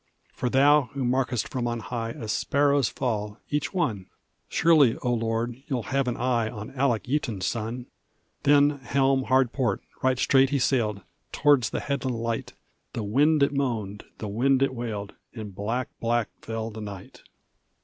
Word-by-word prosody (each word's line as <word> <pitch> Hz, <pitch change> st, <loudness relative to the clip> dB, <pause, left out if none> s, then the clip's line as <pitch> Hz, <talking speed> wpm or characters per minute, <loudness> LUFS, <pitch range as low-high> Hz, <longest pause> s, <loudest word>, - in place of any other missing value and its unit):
"For 125 Hz, -, -2 dB
Thou, 140 Hz, +1 st, +4 dB
who 135 Hz, -2 st, -1 dB
markest 125 Hz, -1 st, 0 dB
from 125 Hz, -4 st, -2 dB
on 120 Hz, 0 st, -2 dB
high 115 Hz, 0 st, -4 dB
A 115 Hz, -1 st, -7 dB
sparrow's 140 Hz, +3 st, +2 dB
fall 105 Hz, -5 st, -3 dB
each 150 Hz, 0 st, -1 dB
one! 115 Hz, -, -1 dB, 0.4 s
Surely, 150 Hz, -8 st, +4 dB
O 125 Hz, -1 st, +1 dB
Lord, 115 Hz, +2 st, -2 dB
thou'lt 125 Hz, -5 st, -2 dB
have 135 Hz, -1 st, +1 dB
an 120 Hz, -, -1 dB
eye 120 Hz, -2 st, +1 dB
On 105 Hz, -2 st, -8 dB
Alec 130 Hz, -4 st, +1 dB
Yeaton's 120 Hz, -9 st, -1 dB
son!" 115 Hz, +3 st, -3 dB, 0.6 s
Then, 145 Hz, 0 st, +4 dB
helm 135 Hz, 0 st, +1 dB
hard 130 Hz, -2 st, +3 dB
port; 120 Hz, -8 st, -1 dB, 0.2 s
right 130 Hz, -1 st, +2 dB
straight 135 Hz, +1 st, +4 dB
he 145 Hz, -, +1 dB
sailed 115 Hz, -6 st, +1 dB, 0.3 s
Towards 145 Hz, -6 st, +3 dB
the -, -, -3 dB
headland 135 Hz, -4 st, -2 dB
light: 115 Hz, 0 st, -3 dB, 0.4 s
The 115 Hz, -, -3 dB
wind 145 Hz, +8 st, +3 dB
it 140 Hz, -, +2 dB
moaned, 110 Hz, -8 st, -2 dB
the 110 Hz, -, -5 dB
wind 130 Hz, +6 st, +2 dB
it 135 Hz, -, +1 dB
wailed, 110 Hz, -5 st, -5 dB, 0.2 s
And 105 Hz, -3 st, -7 dB
black, 115 Hz, +6 st, -2 dB
black 120 Hz, -1 st, 0 dB
fell 115 Hz, 0 st, -4 dB
the 110 Hz, 0 st, -8 dB
night. 100 Hz, -3 st, -9 dB
125 Hz, 165 wpm, -26 LUFS, 115-135 Hz, 0.6 s, Thou